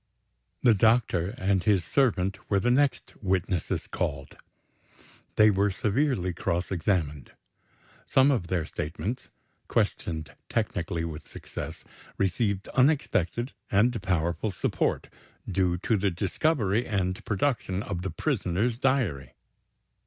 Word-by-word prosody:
The 120 - +7
doctor 105 -4 +2
and 95 0 +1
his 95 -2 +2
servant 95 -8 +1
were 100 - +3
the 120 +6 +2
next 140 +2 +1
witnesses 95 -3 -1
called. 70 -2 -3 1.0
They 105 0 +6
were 100 +1 +2
severely 100 -2 0
cross 85 +2 -2
examined. 80 - -1 0.7
Some 135 +2 +5
of 115 -11 0
their 85 -3 0
statements 95 +10 -4 0.4
questioned 80 -2 -1 0.2
technically 85 -6 -1
with 80 -1 -7
success - - -7 0.3
received 100 +1 0
unexpected 125 - +1 0.2
and 115 +2 +2
powerful 90 +2 0
support, 95 - -1 0.4
due 90 -2 +1
to 105 +5 +1
the 100 +1 +1
discovery 105 - 0
and 95 -3 -1
production 105 -3 -1
of 90 -4 -4
the 95 - -3
prisoner's 100 +8 -1
diary. 110 - 0
95 Hz, 115 wpm, -27 LUFS, 85-115 Hz, 1.0 s, The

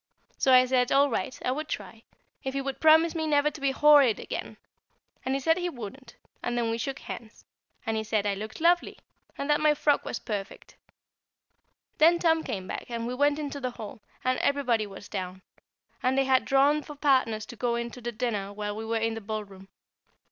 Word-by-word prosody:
So 265 - +2
I 255 0 +7
said, 250 -1 +1
all 280 0 +4
right 225 +3 -2
I 250 - +2
would 305 +4 -3
try, 215 -1 -6 0.4
if 265 0 -4
he 275 - 0
would 270 0 -4
promise 320 +1 +5
never 300 -2 +2
to 300 - -11
be 275 - +2
horrid 280 -4 +5
again; - - -6 0.7
and 260 +1 -1
he - - 0
said 325 +5 +2
he 355 0 -1
wouldn't; 240 - -9 0.3
and 240 0 -2
then 230 -1 0
we 230 - -2
shook 270 +4 -3
hands, 225 -1 -9 0.4
and 225 - -1
he 220 - -1
said 215 -1 0
I 205 - +1
looked 215 +2 -7
lovely, 345 +2 +2 0.4
and 280 - -3
that 295 0 +2
my 305 -1 +4
frock 290 0 +2
was - - -4
perfect; 200 -3 -6
and - - -39
then 335 +3 +6
Tom 325 -2 +2
came 190 -3 -4
back - - -6
and 230 -1 -3
we 245 - -3
went 285 +3 +2
into 290 -2 -4
the 255 -2 -2
hall, 215 0 -8 0.2
and 255 0 +1
everybody 250 -7 +1
was 195 0 -11
down, 185 -2 -5 0.6
and 255 +1 +1
they 270 - +3
had 260 -1 +3
drawn 280 +3 +3
for 295 0 -10
partners 255 -7 +2
to 240 - -10
go 235 +1 0
in 235 0 -3
to 250 - -11
dinner 230 -4 -3
while 205 0 -4
we 220 - -5
were 225 0 0
in 225 0 0
the 225 - -6
ballroom. 200 -2 -6
255 Hz, 210 wpm, -27 LUFS, 220-285 Hz, 0.7 s, I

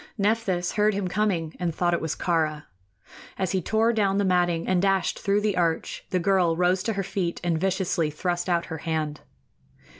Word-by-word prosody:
Nephthys 200 -4 0
heard 210 -1 +2
him 200 -2 -1
coming 180 -5 -1
and 170 -3 -2
thought 175 -1 +1
it 170 - 0
was 160 - -2
Kāra. 155 -3 0 0.7
As 190 -2 -1
he 190 - 0
tore 220 +6 +2
down 200 -3 +1
the 200 - +2
matting 175 -2 +1
and 185 -1 +2
dashed 195 -1 +1
through 200 +1 +1
the 205 -2 0
arch, 170 -2 -1
the 185 - 0
girl 180 -2 +2
rose 180 +1 +2
to 225 +3 -1
her 195 -1 -2
feet 180 -2 -2
and 170 -2 0
viciously 185 -4 0
thrust 175 +4 -2
out 170 -1 +1
her 160 - -5
hand. 155 -2 -3
180 Hz, 190 wpm, -25 LUFS, 170-195 Hz, 0.7 s, heard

